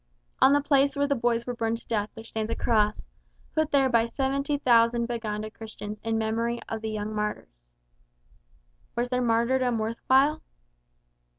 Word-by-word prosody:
On - - +7
the 290 +1 +4
place 280 -1 +3
where 285 0 +1
the 285 - +1
boys 235 -2 0
were 245 - -3
burned 230 -1 -1
to - - -18
death 210 -2 -1
there 225 - -9
stands 220 -1 -4
a 230 - -1
Cross, 215 -3 +1 0.5
put 315 -1 +1
there 275 -3 +3
by 230 -3 +3
70,000 260 -3 +2
Baganda 215 -2 -4
Christians 215 -1 -8
in 225 0 0
memory 230 +2 -1
of 225 -1 -4
the 220 - -3
young 215 0 -4
martyrs. - - -5 1.2
Was 240 +1 -1
their 250 0 0
martyrdom 240 +1 +2
worth 220 +1 -3
while? 280 +4 +4
230 Hz, 165 wpm, -27 LUFS, 220-260 Hz, 1.2 s, On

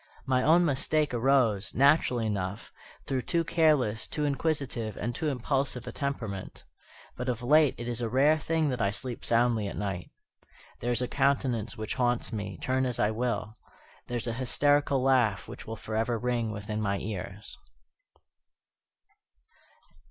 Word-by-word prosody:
My 130 -2 +2
own 165 +6 +5
mistake 150 0 +1
arose, 120 -5 +2
naturally 135 -3 +4
enough, 100 -1 -3 0.3
through 130 -1 -1
too 170 +5 0
careless, 150 -11 +2
too 150 - -2
inquisitive, 140 -7 -2
and 120 +3 -2
too 155 - -3
impulsive 135 -1 -1
a - - -5
temperament. 115 -9 -4 0.5
But 125 +1 -3
of 120 -1 -2
late 150 +3 +4
it 120 - -6
is 120 0 -3
a 115 - -1
rare 145 +6 +4
thing 160 -1 0
that 125 -2 -2
I 100 - +2
sleep 120 +4 -5
soundly 115 -3 +2
at - - -6
night. 95 -4 -3 0.7
There 120 - -1
is 120 +1 +1
a - - -1
countenance 135 -5 0
which 110 -1 -3
haunts 120 -1 0
me, 100 -3 -4
turn 130 0 +1
as 125 - -2
I 105 - +2
will. 115 -1 -2 0.5
There 120 - -2
is 115 - -3
an 115 - -1
hysterical 145 +1 +3
laugh 125 -7 +2
which - - -10
will 115 - -4
forever 110 +3 -1
ring 120 -1 -1
within 105 +1 -4
my 100 -2 0
ears. 100 0 -6
120 Hz, 160 wpm, -29 LUFS, 110-140 Hz, 0.7 s, own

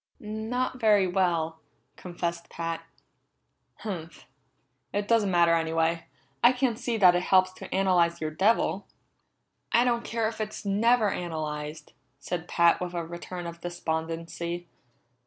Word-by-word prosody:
"Not 225 +4 -3
very 210 -4 +5
well," 170 -3 0 0.4
confessed 170 -1 -4
Pat. 165 -1 -4 1.0
"Humph! 170 -6 -6 0.7
It 205 0 -2
doesn't 225 -3 +3
matter 170 -2 +4
anyway. 165 0 +1 0.4
I 240 +2 +7
can't 250 -3 0
see 240 -3 -1
that 185 -4 +7
it 175 - +1
helps 185 0 +3
to - - -10
analyze 180 -3 +2
your 155 -1 -2
devil." 195 +3 +1 0.8
"I 235 - +5
don't 235 -1 +1
care 230 -1 -1
if 220 0 -5
it's 215 0 -5
never 215 +2 +3
analyzed," 155 -2 -5 0.2
said 160 +4 -4
Pat 170 +1 +3
with 180 -1 -4
a 170 -1 -2
return 175 +1 -7
of 170 0 -7
despondency. 170 0 -4
175 Hz, 135 wpm, -27 LUFS, 165-210 Hz, 1.0 s, I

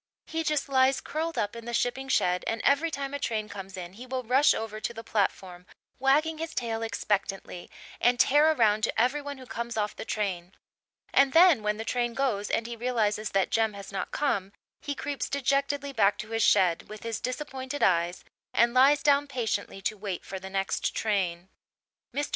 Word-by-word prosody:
He 325 0 -3
just 305 -2 0
lies 265 0 +3
curled 325 +2 -4
up 205 +2 -1
in 230 -1 -8
the 240 0 -3
shipping 265 +3 -1
shed, 180 -7 +2
and 225 - -1
every 290 +4 +3
time 275 -3 -4
a 285 - -2
train 220 -6 -2
comes 195 -2 -8
in 180 0 -7
he 245 +5 -11
will 255 0 -3
rush 260 +5 +4
over 220 -1 -5
to 235 - -3
the 225 - -7
platform, 190 -4 -2 0.3
wagging 300 +4 +2
his 320 0 -5
tail 230 -2 -2
expectantly, 200 -4 -2 0.3
and 245 0 +3
tear 295 +5 +5
around 220 -7 +2
to - - -2
every 255 +5 +2
one 285 -1 -6
who 260 - -11
comes 235 -1 -5
off 210 -1 -1
the - - -6
train. 190 -5 -3 0.6
And 275 -1 +4
then, 335 -7 +7
when 210 0 -1
the 220 - -5
train 240 0 -1
goes 225 -7 0
and 225 - 0
he 235 0 -5
realizes 220 -3 0
that 195 -1 +1
Jem 220 -1 +2
has 200 -1 -9
not 195 - -3
come, 200 -9 -1 0.3
he 285 -1 -4
creeps 285 0 -3
dejectedly 280 +1 0
back 205 -4 +3
to 215 - -7
his 225 0 0
shed, 180 -5 +3
with 215 0 -9
his 230 -2 -3
disappointed 265 +1 -4
eyes, 175 -1 +2 0.3
and 235 0 +4
lies 275 +3 +5
down 285 0 +4
patiently 215 -7 -3
to 215 - -1
wait 195 -3 -5
for 190 - -6
the 190 +1 -8
next 195 0 -1
train. 185 -5 -1 0.6
Mr. 290 0 -2
230 Hz, 200 wpm, -28 LUFS, 205-275 Hz, 0.6 s, then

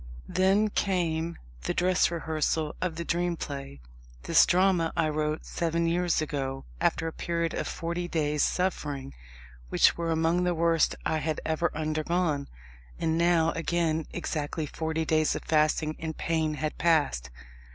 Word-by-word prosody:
Then 195 +3 +3
came 170 -4 0 0.3
the - - -1
dress 180 +1 +3
rehearsal 160 -2 -1
of 180 -3 -1
The 170 +1 -4
Dream 175 +1 0
Play. 140 - -6 0.4
This - - +5
drama 180 -2 +3
I 165 -1 +3
wrote 155 0 -2
seven 170 0 -1
years 170 -1 +1
ago, 135 -3 -3
after 165 - +1
a 160 - -4
period 170 -1 -2
of - - -2
forty 170 +1 -3
days' 150 -3 0
suffering 145 -7 -1 0.6
which - - +4
were 170 -1 -2
among 165 +2 +2
the 180 -1 +1
worst 165 -1 +3
which - - -13
I 160 - +1
had 155 0 -2
ever 160 +2 +1
undergone. 155 -1 0 0.5
And 160 0 0
now 170 -1 +3
again 165 -1 0
exactly 155 -2 -3
forty 160 +2 -2
days 155 -1 +2
of - - -5
fasting 155 0 +2
and 160 -1 -5
pain 160 -2 0
had 150 +1 -3
passed. 145 - +2
160 Hz, 150 wpm, -28 LUFS, 155-170 Hz, 0.6 s, This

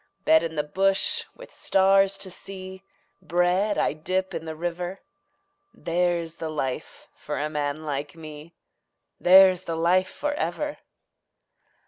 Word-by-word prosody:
Bed 160 - +6
in 165 -1 -4
the 150 - 0
bush 195 +6 0
with - - -13
stars 195 0 +3
to 190 -1 -6
see, 190 0 -9 0.4
Bread 180 +5 +1
I - - +1
dip 185 +5 -2
in 160 - -5
the 160 0 -5
river 175 +3 -4 0.7
There's 170 -1 -1
the 160 - -4
life 135 -4 -4
for - - -5
a 150 +1 -2
man 150 +1 -3
like 145 0 -4
me, 155 0 -11 0.6
There's 185 0 +6
the 165 - -3
life 180 +3 +2
for 295 0 -3
ever. 290 - -3
175 Hz, 135 wpm, -25 LUFS, 160-190 Hz, 0.7 s, Bed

